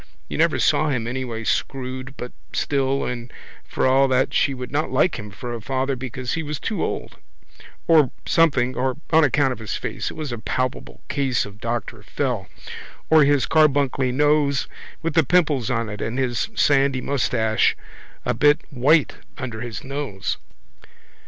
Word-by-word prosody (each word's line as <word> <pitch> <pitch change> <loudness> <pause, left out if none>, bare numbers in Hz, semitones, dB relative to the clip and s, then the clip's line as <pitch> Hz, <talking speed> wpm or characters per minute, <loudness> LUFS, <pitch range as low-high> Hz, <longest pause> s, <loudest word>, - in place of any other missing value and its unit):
You - - -5
never - - +3
saw 155 - +2
him 125 -5 -1
any 130 +2 -3
way 115 -2 -5
screwed 130 +2 -3
but 125 - -6 0.2
still 135 -1 0
and 120 -1 -5 0.3
for - - -2
all 135 +1 +5
that 130 0 +1
she - - +3
would 125 -1 -7
not 150 +3 0
like 185 - +2
him 105 0 -7
for 120 +4 -6
a 115 - -5
father 135 +3 -1
because 130 0 -4
he 165 - -1
was 150 -3 -4
too 220 - -2
old - - -4 0.7
or 155 -5 +6 0.2
something 135 -7 +3
or 130 +1 -1
on 160 0 +6
account 145 -1 +3
of - - -10
his 110 -2 -4
face - - -3
(it - - -9
was 155 -4 -4
a 120 - -4
palpable 130 +3 -3
case 135 -4 0
of 105 +1 -12
Doctor 120 -1 -3
Fell) 115 -4 -2 0.6
or 155 -2 +7
his 145 -1 +3
carbuncly 140 -4 +3
nose 145 0 +2 0.4
with 165 -1 -1
the 165 +1 +5
pimples 150 -6 +2
on 115 -2 0
it 105 -1 -6
and 115 +3 -3
his 130 - 0
sandy 140 -5 +3
moustache 120 -5 +1 0.5
a - - +1
bit 145 +1 +4
white 145 +3 +3 0.2
under 120 -5 -5
his 120 -3 -6
nose. 135 -8 -3
130 Hz, 170 wpm, -22 LUFS, 120-145 Hz, 0.7 s, or